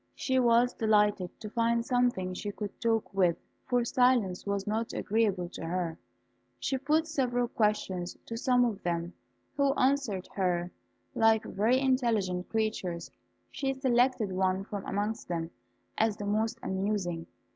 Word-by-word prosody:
She 260 Hz, -1 st, +1 dB
was 240 Hz, 0 st, +4 dB
delighted 210 Hz, -4 st, +1 dB
to 215 Hz, -, -6 dB
find 235 Hz, 0 st, +1 dB
something 245 Hz, -8 st, +1 dB
she 205 Hz, +3 st, -4 dB
could 205 Hz, 0 st, -7 dB
talk 225 Hz, -3 st, 0 dB
with, 180 Hz, -3 st, +3 dB, 0.3 s
for 245 Hz, -2 st, +2 dB
silence 240 Hz, -8 st, +2 dB
was 200 Hz, -1 st, -1 dB
not 220 Hz, +2 st, -2 dB
agreeable 205 Hz, -5 st, 0 dB
to -, -, -8 dB
her. 170 Hz, -1 st, -2 dB, 0.6 s
She 265 Hz, -, -1 dB
put 305 Hz, +4 st, +2 dB
several 245 Hz, -6 st, 0 dB
questions 195 Hz, -6 st, -1 dB
to 230 Hz, -, -6 dB
some 245 Hz, +1 st, +3 dB
of 215 Hz, -4 st, -2 dB
them, 170 Hz, 0 st, -2 dB, 0.4 s
who 280 Hz, -1 st, +3 dB
answered 255 Hz, -8 st, +1 dB
her 180 Hz, -2 st, 0 dB, 0.4 s
like 225 Hz, -1 st, +4 dB
very 225 Hz, +6 st, +2 dB
intelligent 230 Hz, -9 st, +1 dB
creatures. 215 Hz, -6 st, -2 dB, 0.4 s
She 270 Hz, -1 st, -2 dB
selected 250 Hz, -5 st, +2 dB
one 185 Hz, +1 st, +1 dB
from 200 Hz, -1 st, -6 dB
amongst 210 Hz, +3 st, -2 dB
them 165 Hz, -1 st, -3 dB, 0.5 s
as 220 Hz, -1 st, +2 dB
the 205 Hz, -, -5 dB
most 215 Hz, +2 st, 0 dB
amusing. 190 Hz, -4 st, -2 dB
215 Hz, 145 wpm, -30 LUFS, 185-245 Hz, 0.6 s, was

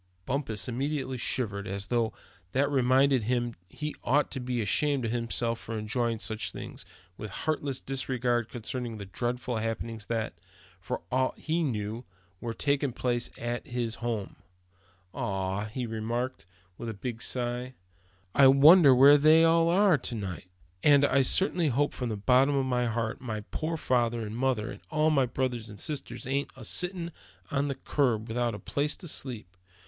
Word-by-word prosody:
Bumpus 115 Hz, -7 st, -2 dB
immediately 130 Hz, 0 st, -2 dB
shivered, 105 Hz, -5 st, -2 dB
as 100 Hz, +1 st, -3 dB
though 115 Hz, -1 st, 0 dB, 0.4 s
that 140 Hz, +2 st, +2 dB
reminded 130 Hz, -2 st, +3 dB
him 120 Hz, 0 st, 0 dB, 0.2 s
he 150 Hz, +6 st, -5 dB
ought 145 Hz, +3 st, +2 dB
to 135 Hz, -, -3 dB
be 125 Hz, -1 st, -2 dB
ashamed 135 Hz, +5 st, +1 dB
of 110 Hz, -, -1 dB
himself 115 Hz, -1 st, -1 dB
to 115 Hz, -, -4 dB
be -, -, -2 dB
enjoying 115 Hz, +2 st, -1 dB
such 110 Hz, 0 st, -2 dB
things, -, -, -8 dB, 0.3 s
with 105 Hz, -, -5 dB
heartless 140 Hz, +4 st, -2 dB
disregard 125 Hz, -3 st, -1 dB
concerning 120 Hz, -1 st, -5 dB
the 100 Hz, -, -7 dB
dreadful 120 Hz, +4 st, -3 dB
happenings 115 Hz, -1 st, -4 dB
that, 115 Hz, -2 st, -2 dB, 0.5 s
for -, -, -4 dB
aught 130 Hz, +1 st, +1 dB
he 165 Hz, +2 st, -1 dB
knew, 110 Hz, -5 st, -2 dB, 0.4 s
were 115 Hz, -1 st, -4 dB
taking 140 Hz, -1 st, +1 dB
place 120 Hz, 0 st, -1 dB
at 120 Hz, +5 st, -4 dB
his 120 Hz, -3 st, -2 dB
home. 115 Hz, -4 st, -3 dB, 0.8 s
"Ah!" 95 Hz, +1 st, -2 dB
he 120 Hz, +4 st, -4 dB
remarked, 115 Hz, 0 st, -3 dB, 0.3 s
with 120 Hz, -, -4 dB
a 110 Hz, -, -5 dB
big 115 Hz, +2 st, -5 dB
sigh; 125 Hz, +1 st, -2 dB, 0.6 s
"I 140 Hz, -, +7 dB
wonder 140 Hz, +1 st, +8 dB
where 140 Hz, +3 st, +8 dB
they 155 Hz, +2 st, +6 dB
all 165 Hz, 0 st, +4 dB
are 185 Hz, -3 st, +4 dB
to 120 Hz, -, -3 dB
night. 95 Hz, -4 st, -6 dB, 0.3 s
And 145 Hz, +1 st, +6 dB
I 140 Hz, -1 st, +3 dB
certainly 175 Hz, +4 st, +3 dB
hope 145 Hz, +2 st, +1 dB
from 125 Hz, -2 st, -3 dB
the 110 Hz, -, -3 dB
bottom 130 Hz, +6 st, +4 dB
of 135 Hz, -1 st, +1 dB
my 125 Hz, -1 st, +1 dB
heart, 115 Hz, -1 st, -2 dB
my 110 Hz, -4 st, -4 dB
poor 160 Hz, +1 st, -2 dB
father 120 Hz, -5 st, +1 dB
and 105 Hz, +1 st, -6 dB
mother, 125 Hz, -3 st, 0 dB
and -, -, -10 dB
all 155 Hz, 0 st, +2 dB
my 135 Hz, -4 st, +3 dB
brothers 125 Hz, -2 st, -2 dB
and 105 Hz, -2 st, -10 dB
sisters 150 Hz, +4 st, -4 dB
ain't 140 Hz, +2 st, -1 dB
a -, -, -8 dB
sittin' 175 Hz, -2 st, -1 dB, 0.4 s
on 140 Hz, 0 st, +1 dB
the 140 Hz, -, -2 dB
curb, 125 Hz, -5 st, 0 dB
without 120 Hz, 0 st, -1 dB
a -, -, -5 dB
place 145 Hz, +1 st, -1 dB
to 175 Hz, -, -9 dB
sleep 125 Hz, -7 st, -3 dB
in. 95 Hz, -, -32 dB
125 Hz, 175 wpm, -29 LUFS, 115-140 Hz, 0.8 s, wonder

